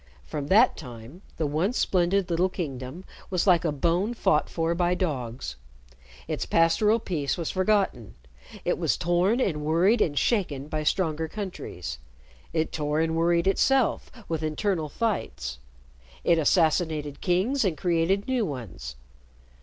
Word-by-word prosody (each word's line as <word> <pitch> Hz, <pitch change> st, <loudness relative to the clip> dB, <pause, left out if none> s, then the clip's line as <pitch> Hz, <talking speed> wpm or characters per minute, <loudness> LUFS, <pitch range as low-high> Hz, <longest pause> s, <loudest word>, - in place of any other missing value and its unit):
From 140 Hz, -, -4 dB
that 220 Hz, -, +5 dB
time, 125 Hz, +4 st, -10 dB, 0.2 s
the 160 Hz, -, 0 dB
once 165 Hz, -, 0 dB
splendid 185 Hz, +1 st, +1 dB
little 175 Hz, +3 st, +2 dB
kingdom 145 Hz, 0 st, -6 dB, 0.2 s
was 180 Hz, -2 st, 0 dB
like 180 Hz, -4 st, +4 dB
a 165 Hz, -, +1 dB
bone 175 Hz, -, 0 dB
fought 150 Hz, -8 st, +2 dB
for 165 Hz, 0 st, 0 dB
by 175 Hz, +1 st, +1 dB
dogs. 125 Hz, -, -3 dB, 0.7 s
Its -, -, -3 dB
pastoral 210 Hz, +7 st, +3 dB
peace 160 Hz, -10 st, -2 dB
was 170 Hz, -3 st, -2 dB
forgotten. 185 Hz, -, 0 dB, 0.5 s
It -, -, 0 dB
was -, -, +1 dB
torn 180 Hz, +7 st, +2 dB
and 160 Hz, -12 st, 0 dB
worried 180 Hz, +9 st, +3 dB
and 145 Hz, -3 st, +1 dB
shaken 150 Hz, -, 0 dB
by 155 Hz, 0 st, -2 dB
stronger 160 Hz, 0 st, 0 dB
countries. 120 Hz, -, -6 dB, 0.5 s
It 160 Hz, -1 st, -1 dB
tore 150 Hz, 0 st, -1 dB
and 160 Hz, 0 st, +1 dB
worried 170 Hz, +1 st, +2 dB
itself 250 Hz, +6 st, +2 dB, 0.2 s
with 160 Hz, -2 st, -2 dB
internal 155 Hz, +1 st, -1 dB
fights. 65 Hz, -, -3 dB, 0.6 s
It 170 Hz, -1 st, +4 dB
assassinated 155 Hz, -3 st, +1 dB
kings 200 Hz, +10 st, +1 dB
and 180 Hz, -6 st, 0 dB
created 175 Hz, +4 st, +1 dB
new 255 Hz, -3 st, +1 dB
ones. 110 Hz, -, -6 dB
165 Hz, 140 wpm, -26 LUFS, 150-190 Hz, 0.7 s, that